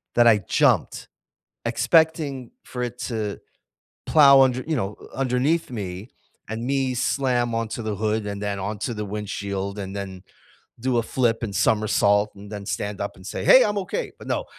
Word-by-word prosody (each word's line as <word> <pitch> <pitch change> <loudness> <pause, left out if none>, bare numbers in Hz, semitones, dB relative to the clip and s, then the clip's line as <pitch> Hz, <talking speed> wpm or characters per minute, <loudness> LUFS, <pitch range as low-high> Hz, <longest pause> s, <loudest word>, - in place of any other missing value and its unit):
that 120 0 +6
I 110 -3 +6
jumped - - +1 0.6
expecting 155 -6 +1
for 125 - -6
it 125 0 -4
to 110 -5 -3 0.7
plow 140 -3 +7
under 130 -1 +2
you 160 - 0
know, 100 -4 -2 0.2
underneath 135 +5 0
me 100 -2 -6 0.4
and 110 +2 -4
me 135 -1 0
slam 120 -2 0
onto 115 +1 -3
the 110 -1 -3
hood 110 +1 -1
and 100 0 -5
then 100 -1 -2
onto 105 +4 -3
the 105 -1 -4
windshield 100 -1 -4
and 95 0 -6
then 95 -2 -6 0.6
do 125 0 0
a 115 - +2
flip 115 -1 0
and 100 -4 -4
somersault 105 +1 +2
and 100 +1 -12
then 100 -1 -6
stand 100 +1 -3
up 100 - -4
and 95 -2 -15
say, - - -5
"Hey, 260 - +8
I’m 205 0 -1
okay," 470 - -4
but - - -11
no. - - -1
110 Hz, 175 wpm, -24 LUFS, 100-130 Hz, 0.7 s, Hey